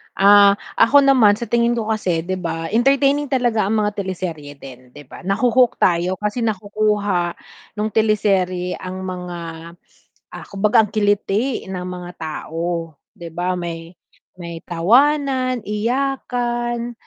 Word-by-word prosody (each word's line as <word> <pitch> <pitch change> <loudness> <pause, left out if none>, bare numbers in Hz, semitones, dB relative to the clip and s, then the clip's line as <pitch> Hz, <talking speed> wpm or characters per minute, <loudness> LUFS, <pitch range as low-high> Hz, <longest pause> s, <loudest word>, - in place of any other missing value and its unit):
Ah, 200 0 +6 0.2
ako 280 +4 +6
naman 250 -7 +5
sa 235 +2 -7
tingin 235 0 +2
ko 225 -2 -3
kasi, 180 -7 -1
'di 185 +2 -3
ba, 165 -2 -4
entertaining 275 +5 +2
talaga 240 -6 +1
ang 215 - 0
mga 210 - 0
teleserye 170 -6 -5
din, 130 -2 -13
'di 145 - -11
ba? 135 - -13
Nahu-hook 240 +5 +2
tayo 175 +1 +2
kasi 210 +4 -3
nakukuha 205 -4 -1 0.4
nung 215 +1 -2
teleserye 195 -4 +1
ang 185 0 -6
mga, 180 -2 -6 0.9
ah, - - -8
kumbaga 210 +3 +3
ang 210 - -13
kiliti 210 +3 0
ng 185 -1 -5
mga 180 -1 -7
tao, 165 +1 -4 0.2
'di 170 -1 -8
ba, 180 +2 -2
may 165 -1 -6 0.5
may 170 -1 -7
tawanan, 255 - +2
iyakan, 240 +1 -2
205 Hz, 135 wpm, -20 LUFS, 175-235 Hz, 0.9 s, Ah